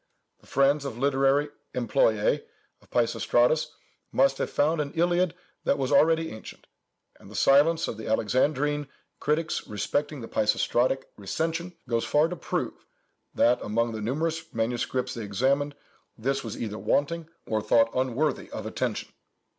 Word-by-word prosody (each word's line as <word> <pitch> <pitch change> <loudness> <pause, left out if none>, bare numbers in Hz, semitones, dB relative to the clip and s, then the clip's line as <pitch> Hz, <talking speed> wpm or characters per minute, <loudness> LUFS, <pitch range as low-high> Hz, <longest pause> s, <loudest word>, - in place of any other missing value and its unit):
The - - -22
friends 140 +2 +3
or 140 - -2
literary 135 +3 +2 0.3
employês - - +2 0.4
of - - -24
Peisistratus - - +2 0.4
must 275 0 +3
have - - -1
found 155 +2 +2
an 140 -1 -4
Iliad 175 +1 +2 0.3
that - - +2
was 135 -1 -1
already 160 +3 +4
ancient, 110 - -10 0.5
and - - -15
the - - -11
silence 150 +4 +4
of 110 - -4
the 110 - -7
Alexandrine 145 +6 +1 0.3
critics 155 +2 -1
respecting 145 +7 -2
the 115 - -7
Peisistratic 120 +4 +1
"recension," 165 - -3
goes 115 -1 0
far 150 +2 +3
to 180 - -4
prove, - - -4 0.5
that, 120 +1 +3
among 115 +2 0
the 110 -1 -5
numerous 160 +7 -2
manuscripts 120 +3 -1
they 115 - -5
examined, 135 +8 0 0.4
this 135 +4 -1
was 115 - -6
either 110 -2 -4
wanting, 165 +3 0 0.2
or 110 -1 -1
thought 115 +1 +3
unworthy 130 +4 0
of - - -6
attention. - - -3
140 Hz, 145 wpm, -27 LUFS, 115-160 Hz, 0.5 s, already